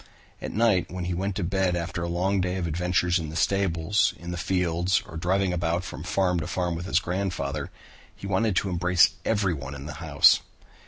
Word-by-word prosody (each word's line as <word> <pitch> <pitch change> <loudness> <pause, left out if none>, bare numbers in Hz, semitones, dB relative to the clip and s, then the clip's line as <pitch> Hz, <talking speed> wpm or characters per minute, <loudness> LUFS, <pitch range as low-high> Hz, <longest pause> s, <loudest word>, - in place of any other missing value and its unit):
At - - -4
night 110 -5 +2
when 90 0 -5
he 90 - -2
went 95 +2 -2
to 100 - -2
bed 95 0 +1
after 85 -1 -3
a 85 - -2
long 95 +3 +1
day 90 0 -1
of 90 -2 -2
adventures 90 +2 +1
in 80 -2 -5
the 80 - -8
stables, 95 0 +1
in 85 +1 -7
the - - -3
fields, 90 +1 0
or - - -11
driving 90 +3 +1
about 85 0 -1
from 75 - -7
farm 90 +1 +1
to 80 - -4
farm 90 -1 -1
with 85 +2 -5
his - - +2
grandfather, 90 -6 -3 0.5
he - - -10
wanted 100 +1 +1
to 95 - +1
embrace 90 0 +4
everyone 85 -11 -1
in 70 0 -8
the 75 - -6
house. - - +5
90 Hz, 205 wpm, -26 LUFS, 85-95 Hz, 0.5 s, house